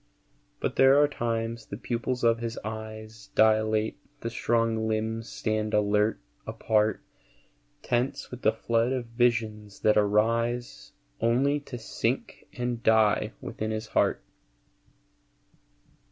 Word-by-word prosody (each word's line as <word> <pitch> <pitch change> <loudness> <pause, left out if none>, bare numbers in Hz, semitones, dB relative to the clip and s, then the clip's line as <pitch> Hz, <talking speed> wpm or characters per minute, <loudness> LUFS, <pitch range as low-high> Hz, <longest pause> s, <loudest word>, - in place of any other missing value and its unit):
But - - -2
there 135 +1 +6
are 145 - +5
times 115 -4 -3
the 100 - -6
pupils 125 +1 -3
of 115 -1 +4
his 115 0 -4
eyes 110 0 -8
Dilate, 110 0 +3 0.2
the 115 - -3
strong 115 -1 0
limbs 110 +1 -2
stand 110 -1 -1
alert, 105 +1 +2 0.3
apart, 110 -1 +1 0.8
Tense 125 +3 -1
with 125 0 -8
the - - +4
flood 115 +2 0
of 125 -2 -2
visions 115 -4 -1
that 105 0 +4
arise 115 +4 0 0.3
Only 130 +6 +2
to 140 -3 -8
sink 115 - -3
and 120 -1 -3
die 110 -1 +3
within 110 - -4
his 110 0 -3
heart. - - +1
115 Hz, 120 wpm, -27 LUFS, 110-120 Hz, 0.8 s, there